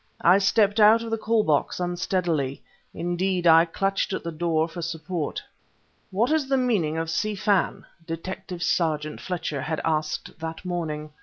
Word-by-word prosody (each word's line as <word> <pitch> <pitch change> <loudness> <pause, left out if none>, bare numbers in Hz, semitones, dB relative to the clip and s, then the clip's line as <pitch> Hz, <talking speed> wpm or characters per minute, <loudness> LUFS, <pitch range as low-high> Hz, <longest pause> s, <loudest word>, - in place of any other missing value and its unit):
I 180 +3 +6
stepped 205 +1 +3
out 220 +2 +6
of 230 - -6
the 225 - +1
call 220 0 +2
box 150 0 +1
unsteadily. 175 -6 -1 0.3
Indeed, 175 +1 -1
I 165 0 +7
clutched 195 +3 -1
at - - -3
the 170 - -4
door 160 0 0
for 170 +1 -7
support. 165 0 -4 0.7
"What 225 +8 +1
is 310 -4 +1
the 270 - +3
meaning 205 -12 +1
of 165 0 -2
Si 210 +6 -1
Fan?" 200 -1 +1 0.2
Detective 170 +1 -5
sergeant 155 -3 0
Fletcher 165 -6 -3
had 155 +3 -2
asked 155 -1 -2
that 160 +2 -6
morning. 155 -4 -3
175 Hz, 160 wpm, -25 LUFS, 160-195 Hz, 0.7 s, I